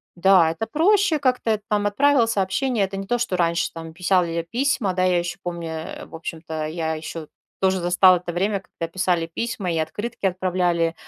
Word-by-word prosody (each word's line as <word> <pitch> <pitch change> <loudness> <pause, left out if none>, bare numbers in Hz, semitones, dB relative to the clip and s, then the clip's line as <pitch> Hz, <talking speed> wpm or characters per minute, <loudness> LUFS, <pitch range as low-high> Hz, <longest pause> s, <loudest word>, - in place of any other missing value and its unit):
да, 175 -2 +5
это 220 +7 -4
проще 365 +2 +3
как-то, 250 -5 +1
и - - -7
там 205 -1 +1
отправил 270 +3 +3
сообщение. 215 +3 0
Это 195 0 -6
не 195 - -5
то, 245 +3 +1
что 235 -6 -1
раньше 170 -1 +1
там 165 -1 -8
писяли 180 0 +1
я 165 0 -2
письма. 235 +1 0
Да, 185 0 0
я 180 -1 +3
ещё 175 +1 -4
помню, 170 -2 -5
э, 160 0 -6
в - - -20
общем-то, 160 -1 -5
я 160 0 -2
ещё 155 0 -7 0.3
тоже 190 -1 +2
застала 180 +1 +5
это 175 0 -6
время, 200 +3 0
когда 165 - -7
писали 180 -2 0
письма 200 0 -3
и 165 - -1
открытки 205 +8 -4
отправляли 180 -2 0
185 Hz, 195 wpm, -23 LUFS, 170-210 Hz, 0.3 s, да